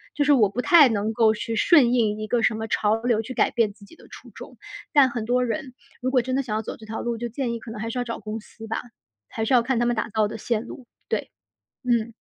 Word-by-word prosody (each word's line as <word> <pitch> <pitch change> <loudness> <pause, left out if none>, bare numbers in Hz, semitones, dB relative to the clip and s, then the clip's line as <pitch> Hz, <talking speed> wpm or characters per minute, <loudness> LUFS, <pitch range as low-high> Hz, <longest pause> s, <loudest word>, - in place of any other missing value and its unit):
就 290 - +1
是 290 - +5
我 220 -7 +4
不 240 +5 -3
太 320 -6 +7
能 220 0 -1
够 220 -1 +3
去 225 +2 -4
顺 250 0 +5
应 220 -4 +1
一 215 - -4
个 235 +2 0
什 225 - +2
么 220 0 -4
潮 215 -1 +1
流 235 -3 +2
去 255 +3 -8
改 - - +2
变 230 -4 +1
自 200 0 -17
己 265 - -17
的 - - -18
初 - - -13
衷。 - - -12 0.3
但 275 -4 +5
很 235 -3 -4
多 250 +2 +1
人 255 +2 -4 0.3
如 255 - 0
果 260 -1 +3
真 255 +1 -2
的 275 - +2
想 230 -5 -4
要 215 - -1
走 - - -6
这 220 - -14
条 220 +1 -4
路， 235 -1 -2
就 240 0 -3
建 240 0 -3
议 235 - -4
可 225 - -11
能 220 -1 -7
还 225 +1 -3
是 250 - -3
要 - - 0
找 235 -1 -5
公 215 +1 -5
司 225 +1 -13
吧， 225 - -3 0.5
还 220 - -3
是 240 - 0
要 245 - +6
看 255 +1 -1
他 240 - +1
们 240 0 +1
打 220 - -2
造 215 0 +1
的 220 - -7
线 230 +1 -2
路， 245 0 -11 0.2
对。 - - -2 0.5
嗯。 235 -2 0
230 Hz, 310 characters per minute, -24 LUFS, 220-250 Hz, 0.5 s, 太